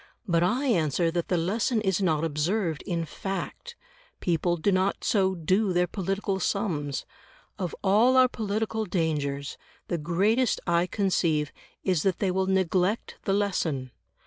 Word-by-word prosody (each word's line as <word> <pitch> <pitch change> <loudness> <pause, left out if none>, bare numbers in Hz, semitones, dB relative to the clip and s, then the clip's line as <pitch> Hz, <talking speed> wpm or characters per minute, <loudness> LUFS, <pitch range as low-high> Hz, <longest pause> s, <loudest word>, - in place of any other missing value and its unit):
But 170 -2 +2
I 245 +11 +1
answer 165 - +2
that 170 0 -2
the 180 - +1
lesson 215 +7 +1
is 190 -2 0
not 160 -4 +1
observed 165 +2 -1
in 170 -3 -1
fact; 195 - -5 0.4
people 175 0 0
do 200 +5 +1
not 190 +1 +1
so 190 -3 +2
do 185 +4 +1
their 180 0 +3
political 195 +1 -2
sums. 150 -9 -1 0.5
Of 180 -4 -3
all 220 +7 +4
our 255 0 +7
political 220 -1 -2
dangers, 150 -6 -2 0.3
the 170 - -1
greatest 200 +10 +1
I 170 0 +2
conceive 170 -7 0 0.3
is 180 -5 +1
that 190 -1 +1
they 195 -3 0
will 190 +1 0
neglect 190 +2 +1
the 195 - +1
lesson. 165 -10 -1
185 Hz, 145 wpm, -27 LUFS, 165-200 Hz, 0.5 s, our